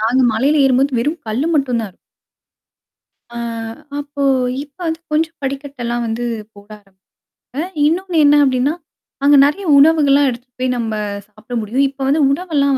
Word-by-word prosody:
நாங்க 235 +4 +2
மலையில 280 +7 +2
ஏறும் 260 -1 +3
போது 270 -3 +1
வெறும் 295 +8 -1
கல்லு 235 +8 -1
மட்டும் 255 -5 +1
தான். 195 -4 -8 1.4
ஆ - - -7 0.6
அப்போ 285 0 -5 0.4
இப்போ 290 +4 -25
வந்து 320 0 -2
கொஞ்சம் 325 +2 0
படிக்கட்டலாம் 270 -3 -4
வந்து 225 +2 -3 0.3
போட 205 0 -16 0.7
ஆரம்பிச்சுட்டாங்க. 295 +6 -6 0.2
இன்னொன்னு 355 +1 -1
என்ன 290 +1 +6
அப்படின்னா, 265 +2 +1 0.5
அங்க 290 0 +6
நிறைய 380 +7 -1
உணவுகள்லாம் 285 -2 +5
எடுத்துட்டு 245 0 -9
போய் 255 0 0
நம்ம 225 -2 -2 0.3
சாப்பிட 215 +3 -10
முடியும். 245 +6 0
இப்ப 275 0 -21
வந்து 295 +3 +2
உணவெல்லாம் 280 -4 +1
275 Hz, 145 wpm, -17 LUFS, 240-295 Hz, 1.4 s, என்ன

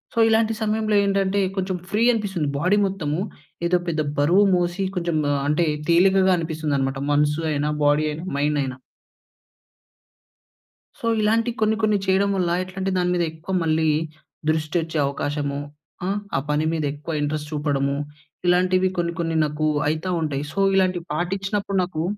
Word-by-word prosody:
So, - - -13
ఇలాంటి 225 0 +3
సమయంలో 215 0 0
ఏంటంటే, 195 0 +1 0.2
కొంచెం 190 -1 -1
ఫ్రీ 215 +2 +2
అనిపిస్తుంది. 190 -9 -1
బాడీ 185 +7 +3
మొత్తము 160 -5 -2 0.5
ఏదో 180 +1 +3
పెద్ద 160 -2 0 0.2
బరువు 175 +8 +5
మోసి, 175 +2 0
కొంచెం 170 -2 0 0.2
ఆహ్, 140 - 0
అంటే, 150 +3 +2 0.2
తేలికగా 190 +2 +5
అనిపిస్తుందన్నమాట. 150 -5 -2
మనసు 150 +2 +2
అయినా, 145 +1 0
బాడీ 145 +1 +3
అయనా, 160 +4 -6
మైండ్ 150 +1 +1
అయినా. 130 -1 -5 2.2
సో, - - -6 0.2
ఇలాంటి 225 +3 +2
కొన్ని, 215 0 +3
కొన్ని 215 -1 +3
చేయడం 195 +1 +2
వల్ల, 180 -3 0
ఎట్లా 185 0 -12
అంటే, 195 +1 0
దాని 180 0 +1
మీద 175 - +1
ఎక్కువ 160 +4 -7
మళ్ళీ, 160 0 +1 0.6
దృష్టి 155 +1 -1
వచ్చే 160 0 -4
అవకాశము. 140 0 -2 0.5
ఆహ్, 200 +2 0 0.2
ఆ - - +2
పని 150 +1 +1
మీద 160 - -1
ఎక్కువ 150 +3 -6
ఇంట్రెస్ట్ 150 0 -2
చూపడము, 140 -2 0 0.5
ఇలాంటివి 185 +1 +3
కొన్ని, 170 0 -1
కొన్ని 165 -1 -1
నాకు 150 +1 -1 0.2
అయితా 160 +4 -1
ఉంటాయి. 145 -3 -2
సో, - - -3 0.2
ఇలాంటివి 185 -3 +1
పాటించినప్పుడు 195 +4 -2
నాకు 170 -3 -3
170 Hz, 150 wpm, -23 LUFS, 150-190 Hz, 2.2 s, బరువు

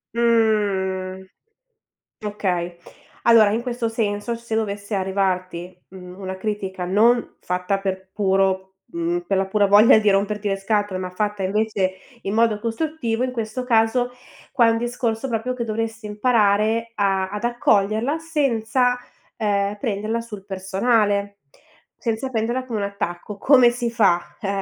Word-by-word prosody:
Mh. 200 -5 +1 1.0
Okay, 180 -4 -2 0.5
allora 225 -3 +6
in 225 +2 0
questo 240 -2 -2
senso 220 0 -2
se 230 -1 -7
dovesse 205 -1 -3
arrivarti, 185 -2 -2
mhmm, 180 0 -11
una 190 -1 -5
critica 190 -3 -3
non 230 +6 +2
fatta 180 +2 -1
per 190 -1 -4
puro 190 -1 +1 0.2
mhmm, 340 +1 -1
pe' - - -1
la 190 0 +1
pura 205 +1 +2
voglia 210 +3 +7
di 210 -1 +3
romperti 205 +1 0
le 195 - 0
scatole, 205 -1 -1
ma 185 -1 -4
fatta 205 +1 -2
invece 195 -1 0 0.3
in 195 - -2
modo 225 -2 +3
costruttivo, 235 0 -2
in 255 - -1
questo 230 +2 -3
caso 245 +1 +2 0.4
qua 235 -3 +4
è - - +5
un 225 - 0
discorso 240 0 -2
proprio 235 +2 -1
che 235 -2 -3
dovresti 225 0 -3
imparare 215 0 +2
a 195 -2 +1
ad 210 +2 -5
accoglierla 230 +4 +1
senza, 255 -6 +1 0.4
ehm, 205 -1 0
prenderla 220 -1 -2
sul 210 -4 -10
personale, 200 +1 0 0.6
senza 230 +2 -2
prenderla 240 +2 -1
come 225 -4 -3
un 200 - -1
attacco. 200 0 -5
Come 255 0 +6
si 240 -1 -2
fa? 195 -7 +1
Eh, 200 - -3
210 Hz, 145 wpm, -22 LUFS, 195-230 Hz, 1.0 s, voglia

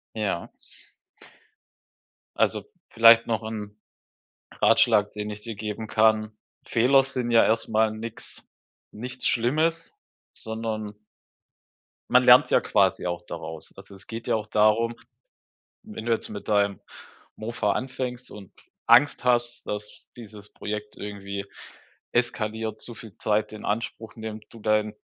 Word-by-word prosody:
Ja. 105 -6 -2 1.9
Also - - +1 0.3
vielleicht 115 0 +7
noch 110 -1 -1
'n 105 -2 -6 0.8
Ratschlag, 105 0 +4
den 105 0 -5
ich 105 0 -7
dir 115 -1 -6
geben 105 +1 -5
kann. 110 -1 +3 0.3
Fehler 130 +4 +4
sind 125 -3 -2
ja 115 - +6
erstmal 110 -1 +2
nix 110 +1 -8 0.5
nichts 125 +4 -4
Schlimmes, 155 +8 +1 0.4
sondern 110 -2 -5 1.1
man - - +5
lernt - - +7
ja - - +6
quasi - - +2
auch 85 -1 -3
daraus. 80 -1 -8
Also, 100 0 -12
es 95 - -16
geht 115 0 -7
ja - - +2
auch 110 -1 -3
darum, 110 +2 +3 0.9
wenn 215 - -8
du 120 - 0
jetzt 115 - 0
mit 105 -1 -8
deinem 100 -1 +2 0.6
Mofa 110 -2 -1
anfängst 125 -1 -4
und 100 -3 -11 0.3
Angst 145 - +5
hast, 120 -1 +1
dass 105 0 -4 0.3
dieses 105 -3 -11
Projekt 105 0 -6
irgendwie 100 -1 -6 0.7
eskaliert, 110 -2 -2
zu 120 - -6
viel 105 -1 -12
Zeit 110 0 0
in 110 - -8
Anspruch 110 0 -3
nimmt, 110 -1 -7
du 115 - -14
deinen 105 0 +1
110 Hz, 130 wpm, -25 LUFS, 105-115 Hz, 1.9 s, vielleicht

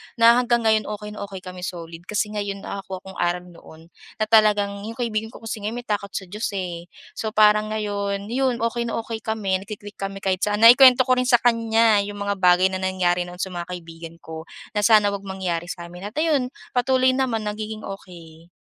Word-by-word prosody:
na 235 0 +6
hanggang 240 -1 +1
ngayon 220 -1 +2
okey 210 0 -6
na 210 - -9
okey 190 -2 -9
kami 180 -1 -9
solid. 165 -2 -7
Kasi 210 0 -1
ngayon 200 -2 -4
nakakuha 195 -1 -6
akong 190 0 -11
aral 175 0 0
noon 170 -1 -16 0.2
na 215 - -1
talagang 210 -2 +3
'yong 225 - -6
kaibigan 220 -3 -2
ko 225 - -14
kung 225 - -5 0.2
may 245 - -5
takot 205 -3 -2
sa - - -2
Diyos, 210 +3 -2
eh. 175 -2 -5 0.2
So, 220 -1 -5
parang 215 0 +4
ngayon 200 -1 -3
'yon, 260 0 +1
okey 235 +1 -1
na - - -3
okey 225 -1 -5
kami 210 -4 -1
nagki-click 205 -1 -9
kami 195 0 -5
kahit 185 -1 0
saan. 210 +1 0
Naikuwento 255 +2 +9
ko 255 - -1
rin 250 - 0
sa 245 -1 +6
kaniya 225 -3 +3
'yong 205 0 -7
mga 200 -1 -2
bagay 180 +1 +4
na 185 - -3
nangyari 180 -2 0
noon 175 0 -10
sa 190 +1 -3
mga 175 -1 -5
kaibigan 165 -2 -9
ko, 160 0 -8 0.2
na 210 - -1
sana 210 -1 +5
huwag 200 0 -6
mangyari 180 -3 -3
sa 175 -1 -7
amin 180 +3 -7
at 210 - -12
ayun, 300 -5 +1 0.2
patuloy 255 +1 +3
naman 255 -4 -1
nagiging 215 +1 -5
okey. 170 -4 -10
205 Hz, 205 wpm, -23 LUFS, 185-225 Hz, 0.2 s, Naikuwento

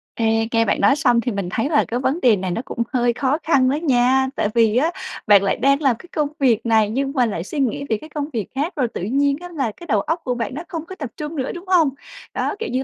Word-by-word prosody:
Ê, 225 0 +1
nghe 230 -1 +3
bạn - - 0
nói 280 - +5
xong 240 -5 +3
thì 245 - -2
mình 200 -4 -3
thấy 225 +9 -1
là 300 - +3
cái 240 - -2
vấn 265 +5 0
đề 235 -4 +5
này 185 -1 -3
nó 200 - -2
cũng 235 - -2
hơi 240 -2 +2
khó 270 +3 0
khăn 265 -5 +3
đó 275 - +1
nha, 265 -3 +2
tại 205 - 0
vì 230 -1 +3
á 315 +6 +2 0.4
bạn 205 -2 +6
lại 195 - +1
đang 275 +2 +2
làm 270 -5 +3
cái - - -13
công 300 -2 +1
việc 245 -5 +2
này 220 -2 +3
nhưng 270 +5 -1
mà 250 -2 +3
lại 200 -7 -3
suy 290 - -5
nghĩ 270 0 0
về 220 - +1
cái 310 - -12
công 295 -1 -4
việc 220 -4 -2
khác 295 +7 -1
rồi 260 -5 +1
tự - - -4
nhiên 275 +8 +1
á 355 - -8
là 275 -9 -2
cái 345 - -11
đầu 215 -9 +2
óc 325 - -2
của 250 -1 -1
bạn 230 0 -3
nó 315 - -5
không 330 -1 -5
có 375 - -9
tập 285 -8 -6
trung 300 +1 -5
nữa, 265 -2 -2
đúng 350 +2 -9
hông? 345 -6 +4 0.4
Đó, - - -1
kiểu 455 - -3
như 260 +1 -1
260 Hz, 290 wpm, -21 LUFS, 225-295 Hz, 0.4 s, bạn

